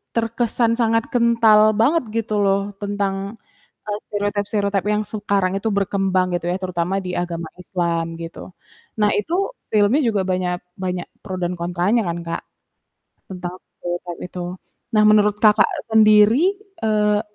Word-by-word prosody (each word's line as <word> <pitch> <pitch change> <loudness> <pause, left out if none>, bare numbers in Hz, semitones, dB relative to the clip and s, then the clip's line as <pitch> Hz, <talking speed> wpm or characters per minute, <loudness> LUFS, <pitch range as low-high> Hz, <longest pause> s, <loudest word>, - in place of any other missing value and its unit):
terkesan 230 0 +1
sangat 230 -1 +2
kental 230 -3 +5 0.2
banget 300 +5 +3
gitu 225 -1 -1
loh 200 +1 +1
tentang, 200 +1 -3 0.5
eee, 210 0 -2
stereotip-stereotip 205 -1 -1
yang 210 - +1
sekarang 200 -3 0
itu 220 +3 -1
berkembang 195 -2 +1
gitu 175 - -6
ya, 180 - 0
terutama 180 0 -2
di 180 -1 -5
agama 170 -2 -3
Islam 170 -2 -1 0.2
gitu. 165 +2 -8 0.5
Nah, 210 0 +4
itu 320 +12 -1 0.4
filmnya 215 +7 +4
juga 215 -4 +1
banyak 180 -1 0 0.2
banyak 180 -1 -3 0.2
pro 190 -3 -5
dan 175 +1 -1
kontranya 180 +6 +1
kan, 170 0 -2
Kak. 165 - -3 0.9
Tentang 180 0 -6 0.3
stereotype 175 0 -5
itu. 180 0 -6 0.5
Nah, 215 - +5
menurut, 210 -1 +4
Kakak, 210 -1 +6 0.2
sendiri, 220 - +5 0.3
eee, 210 -1 +2
205 Hz, 135 wpm, -21 LUFS, 180-215 Hz, 0.9 s, Kakak